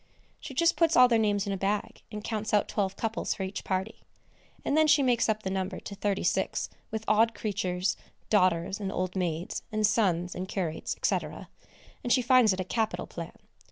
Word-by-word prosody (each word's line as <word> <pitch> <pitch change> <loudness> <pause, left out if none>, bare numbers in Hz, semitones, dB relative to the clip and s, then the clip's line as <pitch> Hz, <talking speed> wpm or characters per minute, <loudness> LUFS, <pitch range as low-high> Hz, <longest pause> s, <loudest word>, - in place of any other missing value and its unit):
She 270 - -9
just 335 +4 +3
puts 330 -1 +3
all 250 0 +9
their 230 -2 +3
names 205 -2 +1
in 200 - -2
a - - -2
bag, 200 +2 -2
and 210 -1 -6
counts 215 -1 -1
out 205 - +2
twelve 195 -2 -1
couples 225 +1 -2
for 195 - -4
each 190 +1 -5
party, 190 +3 -3 0.6
and - - +1
then 315 0 +5
she 295 -1 +5
makes 245 -3 +2
up 215 0 0
the 190 - -2
number 190 -1 -2
to - - -8
thirty 200 0 -1
six - - 0 0.2
with 220 0 -4
odd 225 +2 +3
creatures, 185 -3 -1 0.3
daughters 185 -2 +2
and 195 -2 -3
old 185 -1 -2
maids, 175 -2 -2
and 215 0 +1
sons 180 -5 +1
and 185 +1 -5
curates, 175 -5 -3
&c., - - +3 0.9
and 245 - -2
she 255 0 +4
finds 245 -3 +5
it 185 - -2
a - - 0
capital 220 +4 -1
plan. - - -8
205 Hz, 200 wpm, -28 LUFS, 190-225 Hz, 0.9 s, all